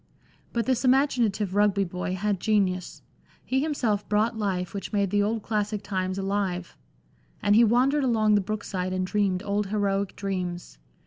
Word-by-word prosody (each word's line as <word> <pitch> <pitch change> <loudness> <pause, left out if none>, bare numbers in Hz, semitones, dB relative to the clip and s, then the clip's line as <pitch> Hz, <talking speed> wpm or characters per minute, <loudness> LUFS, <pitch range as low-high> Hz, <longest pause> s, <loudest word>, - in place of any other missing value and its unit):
But 235 -1 -1
this 260 -1 +1
imaginative 245 -7 +2
Rugby 205 -1 +3
boy 180 0 -3
had 200 0 -1
genius; 190 -3 0 0.4
he 265 +1 +1
himself 240 -9 -1
brought 215 +3 +2
life 190 -4 -2
which 200 - -5
made 200 -3 0
the 205 0 +3
old 215 +1 -1
classic 210 -1 -2
times 185 -1 -2
alive; 195 -2 -2 0.6
and 205 - +3
he 230 - +7
wandered 255 +6 +3
along 220 -4 +3
the 205 - +4
brook 215 +3 -4
side 185 -1 -3
and 185 0 -1
dreamed 195 -1 0
old 205 0 -1
heroic 200 -1 -1
dreams. 180 - -4
205 Hz, 165 wpm, -26 LUFS, 190-220 Hz, 0.6 s, he